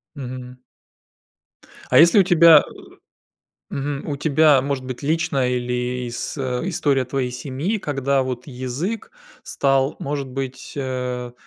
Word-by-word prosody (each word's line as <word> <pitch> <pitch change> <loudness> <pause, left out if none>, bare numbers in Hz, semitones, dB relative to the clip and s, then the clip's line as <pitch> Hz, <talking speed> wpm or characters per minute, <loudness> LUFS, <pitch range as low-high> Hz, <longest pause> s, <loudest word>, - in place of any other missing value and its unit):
Мгм. 125 -1 -8 1.3
А - - +5
если 170 +5 +7
у - - +6
тебя 170 -3 +7 1.1
э, - - -5
мгм. 140 +1 -4
У 140 - -2
тебя 150 -1 +4
может 135 -2 -3
быть 130 +2 -7
личная 155 -4 0
или 125 0 -2
с 120 - -5
э, 130 +6 -2
история 140 -6 +1
твоей 130 0 -2
семьи, 145 - -3
когда 140 -4 0
вот 125 0 -5
язык 140 - -4 0.3
стал, 135 0 +1
может 140 -1 -4
быть, 130 0 -6
а, 125 -2 -3
135 Hz, 130 wpm, -21 LUFS, 125-150 Hz, 1.3 s, если